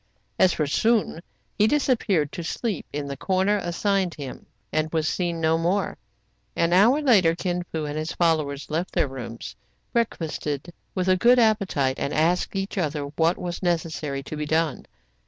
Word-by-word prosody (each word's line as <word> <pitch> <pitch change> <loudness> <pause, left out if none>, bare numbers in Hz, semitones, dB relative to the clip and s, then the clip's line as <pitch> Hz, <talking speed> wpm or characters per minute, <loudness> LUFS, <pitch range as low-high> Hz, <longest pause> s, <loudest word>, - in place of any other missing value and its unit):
As 185 - +6
for 155 - 0
Soun, 215 +3 +1 0.4
he 210 - +5
disappeared 220 - +1
to 175 - -5
sleep 205 +2 -3
in 145 0 -3
the 140 - -4
corner 190 +7 +1
assigned 190 0 0
him, 140 -3 -8 0.3
and 155 0 0
was 160 -1 0
seen 170 -1 -1
no 160 0 +2
more. 180 +5 0 0.6
An 170 +1 +2
hour 235 +11 +5
later 190 - +5
Kin 180 0 -2
Fo 160 -2 -2
and 150 +1 -3
his 155 +1 -3
followers 155 -4 0
left 170 +4 -2
their - - +2
rooms, 125 -3 -7 0.4
breakfasted 165 - -2 0.2
with 185 -1 -1
a 185 0 +4
good 240 +5 +5
appetite, 200 - +2
and 140 - -2
asked 170 +5 +1
each 195 +1 -2
other 150 -3 -1
what 165 +2 +2
was 175 -1 -5
necessary 160 -5 -2
to 155 - -6
be 150 0 -3
done. 160 -3 0
170 Hz, 170 wpm, -24 LUFS, 155-195 Hz, 0.6 s, As